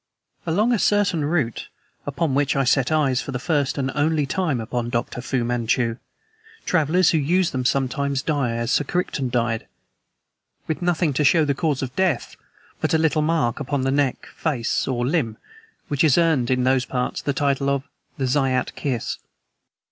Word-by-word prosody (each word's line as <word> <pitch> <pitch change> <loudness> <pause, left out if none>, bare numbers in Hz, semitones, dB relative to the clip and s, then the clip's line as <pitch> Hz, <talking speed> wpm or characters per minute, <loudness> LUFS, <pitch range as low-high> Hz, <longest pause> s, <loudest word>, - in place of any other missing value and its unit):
Along 210 +9 +2
a 230 - +1
certain 200 -7 +2
route 145 -7 -1 0.4
upon 145 0 -1
which 140 +1 +1
I 135 - +2
set 130 +2 +2
eyes, 140 -5 +2
for - - -6
the 125 - -2
first 145 0 0
and 135 -1 -1
only 150 0 +1
time, 155 -3 -1
upon 120 +1 -3
Dr. 120 0 -2
Fu 125 -1 -1
Manchu 120 0 0 0.7
travelers 175 +1 +3
who 160 - +2
use 175 +5 +1
them 130 -1 -2
sometimes 140 +1 0
die 140 -7 0
as 115 +1 -2
Sir - - +3
Crichton 145 -5 -2
died, 115 -2 -1 1.0
with 160 - -2
nothing 175 -3 +1
to 150 - +1
show 155 +2 +4
the 140 - +1
cause 145 -2 -1
of 130 0 -6
death 185 -9 0 0.4
but - - +1
a - - +5
little 160 -1 +2
mark 150 -7 0
upon 140 -1 -2
the 135 - +1
neck, 140 -2 0
face, 135 -8 -1
or 120 -2 -1
limb, 125 -6 0 0.5
which 145 -2 -1
has 155 -3 +4
earned, 160 -8 +2
in 125 -1 +2
those 130 0 +2
parts, 125 -1 -2
the 145 - -1
title 140 0 0
of 140 -1 0 0.3
the 135 - -1
'Zayat 130 -1 +1
Kiss.' 130 -5 -3
140 Hz, 180 wpm, -22 LUFS, 125-160 Hz, 1.0 s, a